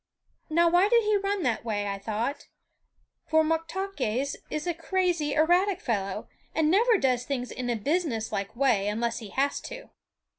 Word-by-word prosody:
Now 340 +2 +4
why 355 +4 +4
did 470 0 +4
he 425 0 +2
run 400 -1 0
that 240 -5 0
way, 210 -3 -2
I 200 0 -3
thought; 225 +7 -3 0.8
for 315 0 +4
Moktaques 320 - -2
is 305 +2 -3
a 350 - 0
crazy, 340 -3 0
erratic 355 +5 +3
fellow, 200 -5 -2 0.3
and 315 -1 +3
never 450 +4 +4
does 255 -6 +1
things 250 -2 -3
in 250 -1 -4
a 240 - +1
businesslike 230 - -2
way 230 -6 +2
unless 230 +3 -1
he 220 -4 -9
has 275 +6 0
to. - - -9
295 Hz, 160 wpm, -27 LUFS, 235-360 Hz, 0.8 s, Now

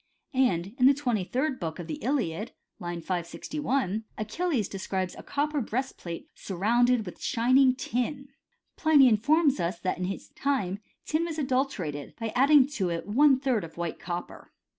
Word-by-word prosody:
* - - -43 0.2
And 175 +4 -3
in 250 - +7
the 275 - +6
twenty 245 -8 0
third 260 +7 -1
book 165 -3 -4
of 175 - -6
the 295 - -5
Iliad 225 - -1 0.3
(line 175 -1 -4
561), 200 - -2
Achilles 235 - -1
describes 190 -1 -3
a - - -9
copper 295 0 -1
breastplate 225 -8 -4
surrounded 230 +5 +1
with 180 - -9
shining 255 +2 +4
tin 250 +2 -1
(^tivov - - -14
Kcuratrepoio). 275 0 -31
Pliny 300 -4 +6
informs 280 +6 +3
us, 170 0 -1
that 185 -1 -1
in 180 - -1
his 195 +2 -5
time 205 -9 -1 0.3
tin 315 +2 0
was 325 -2 -4
adulterated 255 - -2
by 225 -1 -2
adding 275 +1 +6
to 225 -11 -2
it 170 -1 -2
about 205 - -6
one 280 -1 +6
third 255 -7 0
of 165 0 -10
white 170 -1 -3
copper. 175 0 -6
240 Hz, 175 wpm, -28 LUFS, 185-275 Hz, 0.3 s, in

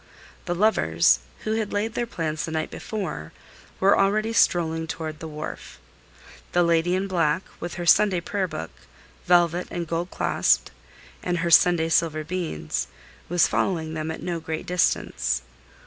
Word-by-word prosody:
The 175 -2 -1
lovers, 80 - +3 0.2
who 215 - -1
had 220 -2 -1
laid 210 +2 -1
their 240 0 -2
plans 155 -7 -3
the 160 - -4
night 160 -1 -2
before, 180 - -5 0.5
were 195 +1 +5
already 215 +3 +2
strolling 165 -6 +2
toward 155 -1 -5
the 160 - -6
wharf. 155 0 -7 0.8
The 175 - +4
lady 170 +1 +2
in 190 +1 0
black, 170 -1 +1 0.2
with 175 0 -5
her 175 - -4
Sunday 190 +1 +5
prayer 195 +1 -2
book, 80 - -6 0.6
velvet 175 0 +3
and 175 -1 -3
gold 170 +2 -2
clasped, - - +1 0.5
and 180 -1 -1
her 170 0 -1
Sunday 165 -1 +5
silver 160 -1 +1
beads, 165 - -3 0.4
was 175 0 +4
following 160 -4 -1
them 155 0 -3
at 160 - -5
no 175 -2 -2
great 160 0 -5
distance. 180 -1 0
170 Hz, 155 wpm, -24 LUFS, 160-185 Hz, 0.8 s, were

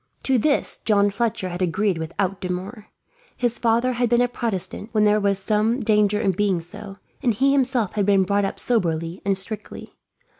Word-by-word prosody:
To 260 -2 +2
this 285 +5 0
John 205 -2 +2
Fletcher 220 -2 -2
had 175 +1 -6
agreed 185 0 0
without 185 +4 -3
demur. 190 +4 -5 0.5
His 240 -1 -1
father 235 +2 +2
had 240 -1 0
been 240 +1 +3
a 245 - +3
Protestant, 225 -3 -3
when 215 -1 +3
there 210 0 +4
was 200 -1 +1
some 215 +5 +1
danger 210 -2 +2
in 195 - +2
being 190 -1 0
so; 195 +4 -8 0.2
and 235 -4 +1
he 275 +5 +3
himself 255 -7 +1
had 205 -2 0
been 195 -2 +4
brought 200 +2 +1
up 195 - -3
soberly 170 -6 -1
and 195 -1 +1
strictly. 210 +3 -5
210 Hz, 185 wpm, -22 LUFS, 190-235 Hz, 0.5 s, there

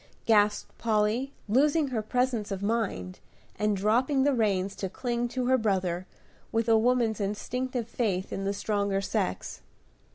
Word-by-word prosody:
gasped 210 -2 +2
Polly, 225 +4 +1 0.2
losing 285 +6 +3
her 235 -4 -1
presence 245 -1 0
of 195 -1 -4
mind, 200 - -2 0.4
and 210 -1 +1
dropping 250 +7 +2
the 285 0 +3
reins 200 -5 +1
to 190 - -4
cling 240 +3 -2
to 250 +1 -2
her 260 +1 +3
brother, 185 -4 0 0.4
with 225 0 0
a 225 - +5
woman's 230 -2 +2
instinctive 245 +4 -2
faith 200 -6 -1
in 195 - -3
the 195 - 0
stronger 200 -1 0
sex. 95 - -2
220 Hz, 150 wpm, -28 LUFS, 200-250 Hz, 0.4 s, a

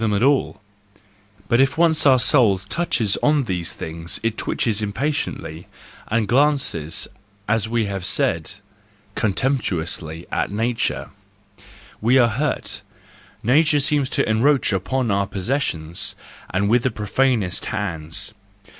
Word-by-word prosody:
them 110 -2 +1
at 100 - +1
all, 140 0 +2 0.9
but 120 +2 +4
if 135 +3 +2
once 160 -3 +4
our 130 -1 +7
soul 115 -5 +4
touches 105 - 0
on 150 -1 +3
these 90 -7 -2
things 80 +1 -4
it 115 -1 0
twitches 110 -2 0
impatiently, 105 - -3 0.4
and 110 -1 0
glances, 130 - +1 0.4
as 110 -1 0
we 115 -1 +1
have 100 -2 -4
said, 85 +1 0 0.6
contemptuously 90 - -1
at - - 0
nature 115 +3 -1 0.4
:— - - -22
we 130 +2 +6
are 120 -2 +5
hurt; 135 +5 -1 0.6
nature 150 +5 +4
seems 145 -2 +1
to - - +1
encroach 120 +2 +2
upon 115 +5 -1
our 100 0 +1
possessions, 90 - -2 0.3
and 100 +2 0
with 120 +3 +3
the 130 - +1
profanest 110 -3 0
hands. 95 0 -3
110 Hz, 130 wpm, -21 LUFS, 95-135 Hz, 0.9 s, our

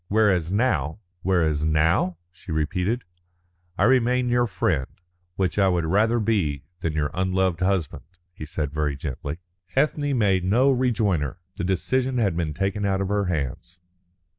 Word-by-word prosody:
Whereas 95 -6 +2
now 90 - +1
" 90 -1 -47
"Whereas 80 -5 +1
now?" 80 +3 +2
she 85 0 -11
repeated. 90 +9 -1 0.7
"I - - +2
remain 125 0 +3
your 120 0 +2
friend, 85 - 0 0.5
which 95 +1 0
I 95 - +5
would 90 -3 +1
rather 110 +7 +2
be 95 - 0 0.2
than 80 - -2
your 75 -1 -1
unloved 95 -1 0
husband," 90 -4 0 0.3
he 80 - -9
said 75 -1 -3
very 75 -2 -1
gently. 70 +1 -5 0.4
Ethne 145 0 +1
made 95 -5 +2
no 120 +9 +3
rejoinder. 105 - 0 0.2
The 85 - -3
decision 125 +8 0
had 100 -8 +1
been 80 -3 -2
taken 100 +2 -1
out 95 -1 +1
of 95 -1 -1
her 100 0 +1
hands. 85 +1 -3
95 Hz, 155 wpm, -24 LUFS, 80-110 Hz, 0.7 s, I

